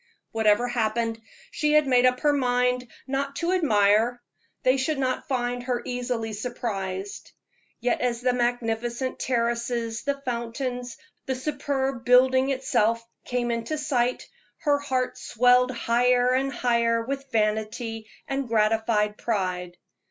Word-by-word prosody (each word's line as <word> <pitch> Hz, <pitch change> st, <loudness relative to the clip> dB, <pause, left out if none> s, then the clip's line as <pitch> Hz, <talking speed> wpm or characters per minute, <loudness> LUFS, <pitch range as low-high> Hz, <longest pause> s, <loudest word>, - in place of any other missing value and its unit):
Whatever 220 Hz, +2 st, +3 dB
happened, 225 Hz, -1 st, -1 dB, 0.3 s
she 300 Hz, 0 st, +1 dB
had 305 Hz, -1 st, +5 dB
made 255 Hz, -1 st, +4 dB
up 250 Hz, 0 st, 0 dB
her 295 Hz, -1 st, +3 dB
mind 250 Hz, -2 st, +1 dB, 0.2 s
not 275 Hz, +1 st, -2 dB
to 340 Hz, +3 st, -1 dB
admire; 225 Hz, -, +3 dB, 0.4 s
they 255 Hz, +1 st, +4 dB
should 275 Hz, +3 st, 0 dB
not 255 Hz, +1 st, -1 dB
find 245 Hz, -3 st, -1 dB
her 245 Hz, -1 st, -2 dB
easily 245 Hz, -3 st, -3 dB
surprised. 205 Hz, -4 st, -4 dB, 0.5 s
Yet 245 Hz, 0 st, 0 dB
as 240 Hz, -2 st, 0 dB
the 250 Hz, 0 st, +2 dB
magnificent 240 Hz, +1 st, -1 dB
terraces, 235 Hz, -2 st, -1 dB
the 280 Hz, 0 st, -2 dB
fountains, 245 Hz, 0 st, -3 dB, 0.3 s
the 260 Hz, -, 0 dB
superb 270 Hz, -2 st, -2 dB
building 260 Hz, +2 st, +5 dB
itself, 230 Hz, -4 st, +1 dB, 0.2 s
came 245 Hz, -1 st, -1 dB
into 230 Hz, +7 st, -2 dB
sight, 250 Hz, -4 st, 0 dB, 0.3 s
her 290 Hz, -2 st, +2 dB
heart 260 Hz, -3 st, -2 dB
swelled 250 Hz, +2 st, +3 dB
higher 245 Hz, +1 st, +2 dB
and 270 Hz, +2 st, +1 dB
higher 235 Hz, -2 st, +1 dB
with 275 Hz, +2 st, -5 dB
vanity 220 Hz, +1 st, -1 dB, 0.2 s
and 275 Hz, -1 st, -2 dB
gratified 215 Hz, -1 st, +1 dB
pride. 180 Hz, -5 st, -2 dB
245 Hz, 130 wpm, -25 LUFS, 230-260 Hz, 0.5 s, had